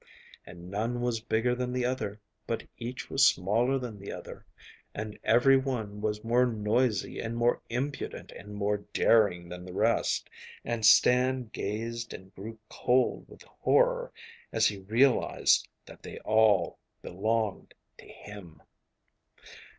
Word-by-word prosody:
And 90 Hz, 0 st, -11 dB
none 115 Hz, +4 st, -2 dB
was 120 Hz, -2 st, 0 dB
bigger 115 Hz, +2 st, 0 dB
than 125 Hz, 0 st, -2 dB
the 125 Hz, -1 st, 0 dB
other, 115 Hz, -5 st, -3 dB, 0.3 s
but 115 Hz, -, -2 dB, 0.2 s
each 120 Hz, +2 st, -6 dB
was 140 Hz, 0 st, +6 dB
smaller 115 Hz, +8 st, +2 dB
than 120 Hz, -5 st, -6 dB
the 100 Hz, -, -7 dB
other, -, -, -9 dB, 0.5 s
and 105 Hz, 0 st, -6 dB
every 130 Hz, +4 st, +5 dB
one 115 Hz, -6 st, -3 dB
was 105 Hz, 0 st, -2 dB
more 120 Hz, +2 st, +3 dB
noisy 110 Hz, 0 st, 0 dB
and 115 Hz, +1 st, -4 dB
more 120 Hz, +1 st, +2 dB
impudent 130 Hz, +4 st, -4 dB
and 105 Hz, +1 st, -10 dB
more 105 Hz, 0 st, 0 dB, 0.2 s
daring 95 Hz, -6 st, +3 dB
than 90 Hz, +1 st, -8 dB
the 90 Hz, 0 st, -9 dB
rest, -, -, +1 dB, 0.4 s
and 120 Hz, -1 st, -3 dB
Stan 125 Hz, +2 st, +4 dB
gazed 115 Hz, +3 st, -4 dB
and 95 Hz, +1 st, -13 dB
grew 110 Hz, +4 st, -8 dB
cold 125 Hz, +3 st, 0 dB
with -, -, -14 dB
horror -, -, +1 dB, 0.4 s
as -, -, +2 dB
he 100 Hz, -2 st, +1 dB
realised 115 Hz, +7 st, +3 dB, 0.2 s
that -, -, -14 dB
they -, -, -9 dB
all 110 Hz, -5 st, +3 dB, 0.2 s
belonged 110 Hz, +3 st, -2 dB, 0.2 s
to -, -, -14 dB
him. 95 Hz, -7 st, -12 dB
115 Hz, 140 wpm, -29 LUFS, 105-125 Hz, 0.5 s, was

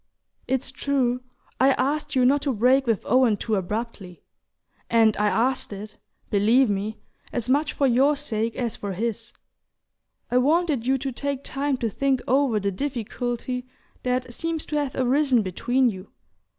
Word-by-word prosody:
It's 265 Hz, 0 st, -1 dB
true, 255 Hz, -3 st, 0 dB, 0.4 s
I 265 Hz, +1 st, +5 dB
asked 295 Hz, +3 st, -1 dB
you 255 Hz, -1 st, +4 dB
not 280 Hz, +3 st, +4 dB
to 280 Hz, -2 st, 0 dB
break 255 Hz, +4 st, +3 dB
with 225 Hz, -4 st, 0 dB
Owen 245 Hz, -3 st, +3 dB
too 220 Hz, -, -3 dB
abruptly 200 Hz, -2 st, -4 dB, 0.7 s
and 225 Hz, -2 st, +4 dB
I 210 Hz, -, +2 dB
asked 250 Hz, +4 st, 0 dB
it, 205 Hz, +1 st, -8 dB, 0.3 s
believe 220 Hz, +4 st, +4 dB
me, 205 Hz, +2 st, -3 dB, 0.3 s
as 240 Hz, -2 st, -2 dB
much 285 Hz, +4 st, +1 dB
for 280 Hz, -, +1 dB
your 270 Hz, +4 st, +4 dB
sake 230 Hz, -6 st, -2 dB
as 240 Hz, -3 st, -2 dB
for 200 Hz, -1 st, -5 dB
his: 225 Hz, +3 st, -3 dB, 1.0 s
I 250 Hz, -, +4 dB
wanted 295 Hz, -3 st, +1 dB
you 265 Hz, +1 st, +3 dB
to 270 Hz, +1 st, -3 dB
take 280 Hz, +2 st, -3 dB
time 275 Hz, 0 st, -1 dB
to 230 Hz, -2 st, -1 dB
think 270 Hz, +3 st, +1 dB
over 260 Hz, -4 st, +2 dB
the 200 Hz, 0 st, -1 dB
difficulty 250 Hz, +1 st, -3 dB, 0.3 s
that 250 Hz, -1 st, -2 dB
seems 330 Hz, +3 st, -3 dB
to 300 Hz, -, -4 dB
have 285 Hz, -3 st, -2 dB
arisen 260 Hz, -2 st, +2 dB
between 245 Hz, +8 st, +1 dB
you. 185 Hz, 0 st, -10 dB
250 Hz, 160 wpm, -24 LUFS, 220-275 Hz, 1.0 s, I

